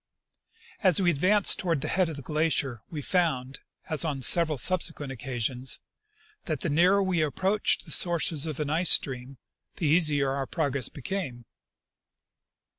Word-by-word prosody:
As 185 Hz, -4 st, +3 dB
we 180 Hz, -3 st, +3 dB
advanced 185 Hz, +7 st, +2 dB
toward 165 Hz, -6 st, -1 dB
the -, -, -3 dB
head 185 Hz, -3 st, +1 dB
of 160 Hz, -, -6 dB
the 140 Hz, -, -8 dB
glacier 150 Hz, -5 st, -1 dB
we 150 Hz, -3 st, -6 dB
found, 135 Hz, -8 st, -1 dB, 0.3 s
as 155 Hz, 0 st, 0 dB
on 140 Hz, -5 st, -3 dB
several 160 Hz, +1 st, +4 dB
subsequent 160 Hz, -2 st, 0 dB
occasions, 125 Hz, 0 st, -2 dB, 0.7 s
that 155 Hz, -3 st, -3 dB
the 165 Hz, -, -2 dB
nearer 180 Hz, +6 st, +3 dB
we 185 Hz, -4 st, 0 dB
approached 190 Hz, +10 st, 0 dB
the 160 Hz, -, -8 dB
sources 165 Hz, -2 st, +3 dB
of 155 Hz, -2 st, -5 dB
an 150 Hz, -1 st, -2 dB
ice 170 Hz, +2 st, +2 dB
stream 130 Hz, 0 st, +1 dB, 0.4 s
the 165 Hz, -, -4 dB
easier 145 Hz, -3 st, +2 dB
our 135 Hz, -1 st, -3 dB
progress 140 Hz, -3 st, -1 dB
became. 135 Hz, -5 st, -6 dB
155 Hz, 150 wpm, -27 LUFS, 135-175 Hz, 0.7 s, several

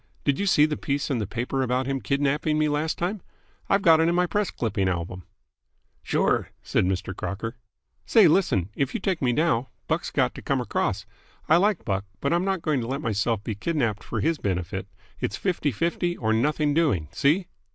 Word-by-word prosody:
Did 140 Hz, -2 st, +1 dB
you 200 Hz, -, 0 dB
see 150 Hz, -5 st, +5 dB
the 155 Hz, -1 st, -2 dB
piece 140 Hz, 0 st, -2 dB
in 125 Hz, -, 0 dB
the 105 Hz, -, -2 dB
paper 125 Hz, +5 st, -2 dB
about 130 Hz, 0 st, 0 dB
him 135 Hz, 0 st, -2 dB
kidnapping 140 Hz, +6 st, +1 dB
me 155 Hz, 0 st, +2 dB
last 150 Hz, +2 st, -1 dB
time? 185 Hz, +3 st, -2 dB, 0.5 s
I've 195 Hz, 0 st, +3 dB
got 165 Hz, -2 st, +6 dB
it 165 Hz, +1 st, +3 dB
in 170 Hz, -, +1 dB
my 180 Hz, 0 st, +3 dB
press 205 Hz, +2 st, 0 dB
clipping 100 Hz, -5 st, -1 dB
album." 90 Hz, 0 st, -4 dB, 0.8 s
"Sure," -, -, +1 dB
said -, -, +1 dB
Mr. 95 Hz, 0 st, -2 dB
Crocker. 110 Hz, +6 st, -4 dB, 0.5 s
"Say, 220 Hz, -6 st, +7 dB
listen. 130 Hz, -, +2 dB
If 135 Hz, +4 st, -1 dB
you -, -, 0 dB
take 185 Hz, -3 st, -1 dB
me 125 Hz, -3 st, +2 dB
now, 135 Hz, -3 st, +1 dB, 0.2 s
Buck's -, -, -1 dB
got -, -, +1 dB
to -, -, -9 dB
come -, -, 0 dB
across. -, -, -1 dB, 0.4 s
I 160 Hz, -, +6 dB
like 205 Hz, +3 st, +1 dB
Buck, 100 Hz, -1 st, -1 dB
but 140 Hz, -, 0 dB
I'm 175 Hz, +1 st, +2 dB
not 190 Hz, -3 st, -1 dB
going 150 Hz, -5 st, +1 dB
to 115 Hz, -, -4 dB
let 135 Hz, +2 st, -2 dB
myself 110 Hz, 0 st, 0 dB
be 110 Hz, -, -3 dB
kidnapped 115 Hz, -, -1 dB
for -, -, -3 dB
his 165 Hz, -2 st, +1 dB
benefit. 95 Hz, 0 st, -2 dB, 0.3 s
It's 100 Hz, -, -2 dB
fifty 175 Hz, -6 st, 0 dB
fifty, 170 Hz, -, -1 dB
or 110 Hz, -2 st, 0 dB
nothing 145 Hz, +5 st, +1 dB
doing. 145 Hz, -, +2 dB
See?" 165 Hz, +6 st, +1 dB
140 Hz, 205 wpm, -25 LUFS, 110-165 Hz, 0.8 s, Say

